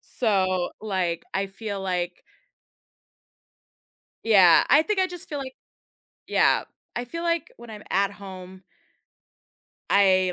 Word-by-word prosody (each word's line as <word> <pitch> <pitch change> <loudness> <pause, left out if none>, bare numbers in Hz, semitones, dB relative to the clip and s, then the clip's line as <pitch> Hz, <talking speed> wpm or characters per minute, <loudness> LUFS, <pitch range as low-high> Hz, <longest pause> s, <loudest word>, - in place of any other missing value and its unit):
so, 185 -6 0
like, 185 -5 -2
I 195 +1 0
feel 200 0 -6
like 180 -2 -3 2.0
Yeah, 190 -7 +6
I 295 - +6
think 420 +4 -2
I 375 - +3
just 355 -2 -9
feel 295 - -4
like 265 -1 -7 0.7
yeah, - - +3 0.3
I 240 - -2
feel 335 +7 -6
like, 335 -2 -1
when 235 0 -12
I'm 210 -1 -9
at 195 +1 +1
home 190 -2 -11 1.3
I, 185 -2 +4
200 Hz, 120 wpm, -25 LUFS, 185-245 Hz, 2.0 s, Yeah